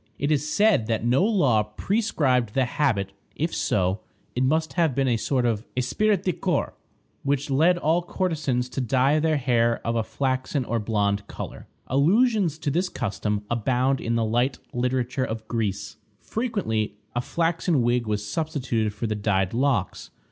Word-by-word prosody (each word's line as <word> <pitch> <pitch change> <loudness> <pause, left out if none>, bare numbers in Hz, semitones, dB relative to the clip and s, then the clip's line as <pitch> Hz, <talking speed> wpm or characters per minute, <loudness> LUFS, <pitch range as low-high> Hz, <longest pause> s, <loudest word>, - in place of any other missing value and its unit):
It 145 +2 -1
is 150 0 0
said 205 - +3
that 115 -1 -1
no 125 +8 +3
law 150 - +3
prescribed 125 - 0
the 135 -1 +3
habit; 105 -7 0 0.2
if 165 +3 -1
so, 95 0 0 0.4
it 125 - +1
must 155 +4 +1
have 165 -7 +1
been 135 -1 +1
a 120 - +3
sort 125 +2 0
of 110 -3 0
esprit 205 +12 +2
de 180 - +1
corps - - -1 0.5
which 140 0 -1
led 165 +6 +4
all 165 +1 +2
courtesans 155 -9 -1
to 135 - -3
dye 135 +4 +2
their 155 0 +2
hair 120 -3 +2
of 115 - 0
a 115 - +2
flaxen 130 +3 -1
or 115 0 -1
blonde 100 -2 0
color. - - -8 0.2
Allusions 185 - +2
to 150 -2 -2
this 180 +5 0
custom 105 -3 -2
abound 125 +4 +1
in 115 0 -1
the 115 -1 +1
light 120 +4 +1 0.2
literature 125 +1 0
of 110 -2 -4
Greece. 105 -2 -3 0.2
Frequently 110 - -2 0.2
a 120 - +1
flaxen 165 -1 0
wig 120 -1 +1
was 105 -1 -2
substituted 125 -5 -1
for 115 - -3
the 110 - -1
dyed 100 -2 0
locks. 125 -5 0
125 Hz, 165 wpm, -25 LUFS, 110-155 Hz, 0.5 s, led